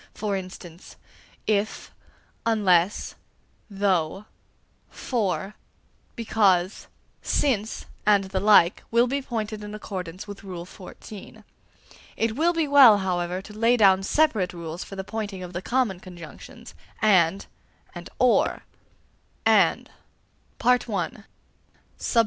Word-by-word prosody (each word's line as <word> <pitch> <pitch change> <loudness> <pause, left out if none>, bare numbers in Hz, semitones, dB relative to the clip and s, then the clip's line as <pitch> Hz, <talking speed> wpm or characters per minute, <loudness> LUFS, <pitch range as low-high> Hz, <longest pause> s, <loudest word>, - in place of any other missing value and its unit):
For 205 +1 -2
instance, 185 -2 -9 0.5
if, 215 0 -1 0.5
unless, 200 -4 +2 0.6
though, 195 -2 0 0.6
for, 210 -4 -2 0.6
because, 200 -5 +1 0.3
since, 225 -6 -1 0.2
and 205 -1 +4
the 190 0 -3
like, 195 -3 +5
will 235 +1 +4
be 275 +3 -2
pointed 215 -4 -4
in 210 0 -7
accordance 185 -3 -7
with 205 -1 -9
Rule 180 -3 -7 0.2
IX. 210 +3 -11 0.7
It 225 0 0
will 330 +5 +2
be 330 -3 0
well, 270 -7 +8
however, 180 -1 -2
to 210 - -12
lay 230 +3 +2
down 195 -3 +5
separate 210 -5 +1
rules 170 0 -6
for 195 - -10
the 190 - -4
pointing 205 -3 -5
of 180 0 -9
the 175 - -4
common 235 -5 0
conjunctions, 175 -4 -12 0.3
and 190 -3 +3 0.5
and - - -9
or. - - +2 0.8
1. - - +4 0.8
_AND. 215 -5 0
200 Hz, 110 wpm, -25 LUFS, 185-220 Hz, 0.8 s, well